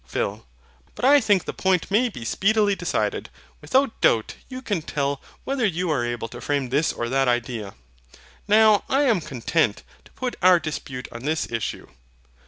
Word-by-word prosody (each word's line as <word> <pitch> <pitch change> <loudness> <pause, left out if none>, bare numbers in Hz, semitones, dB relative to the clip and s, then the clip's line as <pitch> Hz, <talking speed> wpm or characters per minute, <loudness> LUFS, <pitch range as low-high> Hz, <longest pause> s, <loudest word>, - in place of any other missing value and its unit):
PHIL. - - -3 0.5
But - - -2
I 285 +1 +7
think 205 -5 +2
the - - -4
point 190 -1 0
may 240 +5 +3
be 120 - -9
speedily 205 - +2
decided. - - -2 0.3
Without 265 -2 +1
doubt 110 -2 +3 0.2
you 260 0 -7
can 205 -9 -1
tell 140 -3 -2 0.2
whether 270 -2 -2
you 180 -4 0
are 135 -6 +1
able 120 -1 -3
to - - -9
frame 140 -3 -1
this 145 +5 +1
or 120 - -4
that 135 +1 +2
idea. 120 -4 -2 0.7
Now 215 0 +5
I 275 +2 +3
am 230 -10 +2
content 130 -3 -1 0.2
to - - -19
put 255 -1 -4
our 180 -1 +6
dispute 140 -5 -6
on 120 - -8
this 155 +1 -2
issue. 115 -1 -3
165 Hz, 175 wpm, -24 LUFS, -, 0.7 s, I